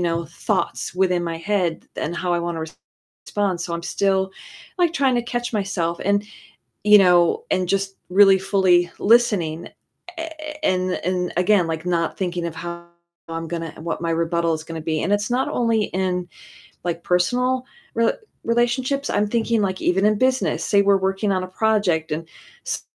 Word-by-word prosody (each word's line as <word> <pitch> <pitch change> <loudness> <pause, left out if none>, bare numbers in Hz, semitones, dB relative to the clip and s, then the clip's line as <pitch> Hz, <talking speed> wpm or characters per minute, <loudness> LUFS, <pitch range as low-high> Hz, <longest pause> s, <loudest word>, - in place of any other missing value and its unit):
know, 170 -1 -1
thoughts 165 +1 -2
within 180 -2 +1
my 165 -1 -3
head 175 -1 -1
and 165 +3 -3
how 180 0 -1
I 175 - +2
wanna 170 -1 -3 0.6
respond, 195 -4 -1
so 170 - -4
I'm 170 - -4
still, 190 +1 0 0.5
like, 345 -2 +3
trying 270 -4 +2
to 240 - +1
catch 240 0 -3
myself 190 -5 -1
and 200 +1 +2 0.6
you 210 0 +7
know, 175 -3 +4
and 185 -1 +1
just 195 +1 -1
really 195 +1 +6
fully 185 -3 +3
listening 200 -8 +2 0.5
a 325 0 -4 0.3
a - - +1
and 185 -1 +1
and 180 0 -1
again, 185 0 +3
like, 165 +1 -4
not 170 -2 0
thinking 175 -2 -2
of 165 - -5
how 170 +1 -7 0.4
I'm 165 0 -5
gonna 165 -1 -4
what 165 +1 -4
my 165 - -1
rebuttal 165 0 +1
is 155 0 -6
gonna 165 0 -6
be, 155 -1 -1
and 200 - 0
it's 205 +1 -2
not 255 +2 +1
only 230 -3 +1
in, 180 -1 -2 0.6
like, 170 -1 -2
personal 250 +8 +1 0.3
re 230 0 +3 0.3
relationships, 250 +4 0
I'm 205 +1 +1
thinking, 230 0 +1
like, 190 -1 -1
even 190 +3 +2
in 215 -1 +2
business, 260 +1 +1
saw 200 - +3
we're 200 0 +4
working 195 +2 0
on 185 -1 0
a - - -7
project 185 -6 +1
and 160 +1 -4 0.4
s - - -2
185 Hz, 175 wpm, -22 LUFS, 170-210 Hz, 0.6 s, you